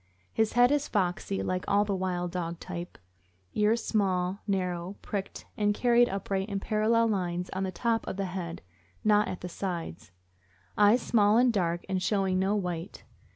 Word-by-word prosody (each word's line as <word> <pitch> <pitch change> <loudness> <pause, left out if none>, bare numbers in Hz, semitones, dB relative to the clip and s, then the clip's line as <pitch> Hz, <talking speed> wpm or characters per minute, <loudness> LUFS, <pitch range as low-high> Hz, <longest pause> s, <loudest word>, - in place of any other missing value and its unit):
His 220 -1 +1
head 245 +2 +5
is 290 0 +1
foxy, 190 -1 -1
like 185 0 -1
all 205 +1 +3
the 200 -1 -1
wild 180 -2 -2
dog 170 -2 -4
type; 175 -1 -7 0.6
ears 215 +2 +2
small, 190 -2 0
narrow, 180 -1 -2
pricked, 200 -2 -5
and 205 -1 +1
carried 240 0 +4
upright 195 +1 -2
in 200 -1 -2
parallel 220 +3 +2
lines 180 -4 -1
on 190 - -3
the 190 -1 -1
top 225 +5 -1
of - - -4
the 195 - -1
head, 180 -2 -5 0.4
not 210 0 +4
at 180 - -5
the 180 - -4
sides. 170 - -5 0.6
Eyes 210 +4 +5
small 210 -1 +4
and 245 0 +4
dark, 175 -4 0
and 190 -1 -1
showing 190 -1 +1
no 195 +2 +1
white. 180 -2 -4
195 Hz, 170 wpm, -29 LUFS, 180-210 Hz, 0.6 s, head